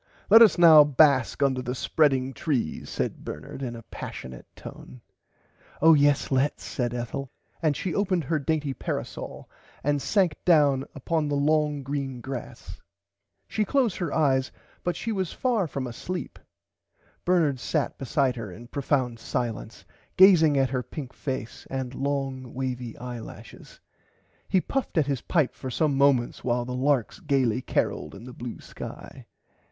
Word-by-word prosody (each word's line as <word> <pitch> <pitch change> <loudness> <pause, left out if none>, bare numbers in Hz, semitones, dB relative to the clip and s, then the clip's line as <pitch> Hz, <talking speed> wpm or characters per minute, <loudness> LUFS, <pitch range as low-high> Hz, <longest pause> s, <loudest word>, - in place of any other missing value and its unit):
Let 225 - +10
us 220 -5 +7
now 160 -3 +9
bask 140 -1 +3
under 130 -2 +1
the 125 0 -4
spreading 135 -1 +1
trees 130 - -2
said - - -3
Bernard - - -7
in 120 -3 -4
a 115 - -10
passiunate 65 -10 -8
tone. 65 0 -11 0.8
Oh 165 +1 +7
yes 145 -2 +3
lets 135 +2 +1
said 120 -3 -2
Ethel 125 +3 -4 0.3
and 155 -4 +1
she 185 - -3
opened 185 -4 +1
her 155 +3 0
[Pg - - -8
91] - - -15
dainty 150 -3 0
parasole - - -5 0.3
and 145 0 +1
sank 185 -4 +1
down 145 -6 +4
upon 155 +2 -1
the 145 - -1
long 150 0 +1
green 135 -2 -3
grass. 130 +1 -8 0.7
She 215 - 0
closed 240 -1 +1
her 170 -5 -2
eyes 135 -4 +2 0.3
but 175 - -1
she 230 - -3
was 190 -5 -2
far 235 -8 0
from 135 -2 -4
asleep. 175 +9 -6 0.8
Bernard 160 -7 +2
sat 150 +3 -2
beside 135 -1 +1
her 110 -4 -6
in 115 +7 -11
profound 130 -4 -1
silence 115 -2 -4 0.3
gazing 165 -6 +7
at 135 -1 +2
her 130 -2 0
pink 130 +1 -8
face 130 -5 -5
and 130 -1 -4
long 135 -2 -3
wavy 125 -3 -4
eye 120 0 -6
lashes. 110 - -12 0.7
He 190 -2 +3
puffed 270 -5 -3
at 155 - +4
his 135 -4 -2
pipe 155 -7 +1
for 130 - -7
some 145 +2 +1
moments 135 -3 +2
while 120 0 0
the 125 - -5
larks 130 -2 0
gaily 130 -5 +1
caroled 75 -9 -2
in - - -11
the 125 0 -10
blue 120 -1 -7
sky. - - -10
140 Hz, 160 wpm, -26 LUFS, 125-155 Hz, 0.8 s, Let